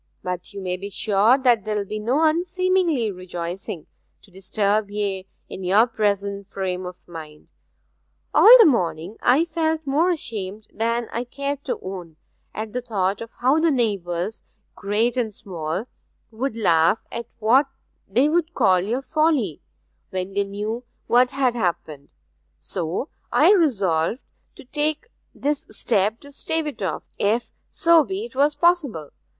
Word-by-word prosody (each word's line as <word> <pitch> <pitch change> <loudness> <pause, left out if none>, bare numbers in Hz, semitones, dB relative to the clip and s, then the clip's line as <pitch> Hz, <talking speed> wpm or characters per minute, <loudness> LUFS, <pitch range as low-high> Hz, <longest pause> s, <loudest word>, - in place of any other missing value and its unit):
'But 180 +1 -4
you 200 -1 -7
may 180 0 -2
be 200 +2 -6
sure 210 +5 +3
that 245 -6 +3
there 215 0 -2
will 200 - -2
be 215 +2 -4
no 250 +9 +1
unseemly 340 - +1
rejoicing, 180 -2 -6 0.4
to 200 - -20
disturb 200 +2 0
ye 200 -2 -2 0.2
in 190 - -8
your 200 +5 +5
present 200 -3 -1
frame 185 -2 -3
of 180 0 -11
mind. 155 -3 -10 0.8
All 485 +3 +10
the 460 - +8
morning 180 - 0
I 270 +7 +4
felt 320 -1 -1
more 300 +6 +2
ashamed 215 - -3
than 230 +1 -1
I 235 - -2
cared 280 +3 -4
to - - -2
own 180 -4 -7 0.4
at 215 0 -6
the 250 - -2
thought 200 -4 -1
of 230 - -6
how 265 +5 +4
the 330 +1 +3
neighbours, 200 - -1 0.3
great 215 +5 0
and 230 -3 0
small, 175 -1 -5 0.5
would 235 +2 -3
laugh 170 -3 +3
at 235 -1 -5
what 245 +6 +4 0.4
they 245 +9 +3
would 335 +1 0
call 190 -7 +4
your 230 +9 -2
folly, 300 - +1 0.5
when 185 +1 -4
they 200 0 +1
knew 210 +4 -4 0.2
what 250 +1 +4
had 265 -2 +1
happened; 165 - -3 0.5
so 170 - -4 0.2
I - - +5
resolved 205 - +2 0.4
to - - -13
take 305 - -2 0.2
this 290 0 -2
step 215 0 0
to 285 - -12
stave 320 +3 -2
it 295 -7 -6
off, 180 -5 -2 0.2
if 220 +4 +1 0.2
so 335 -2 +4
be 390 +8 -4
'twas 290 - +1
possible. 290 - +1
220 Hz, 150 wpm, -23 LUFS, 190-280 Hz, 0.8 s, All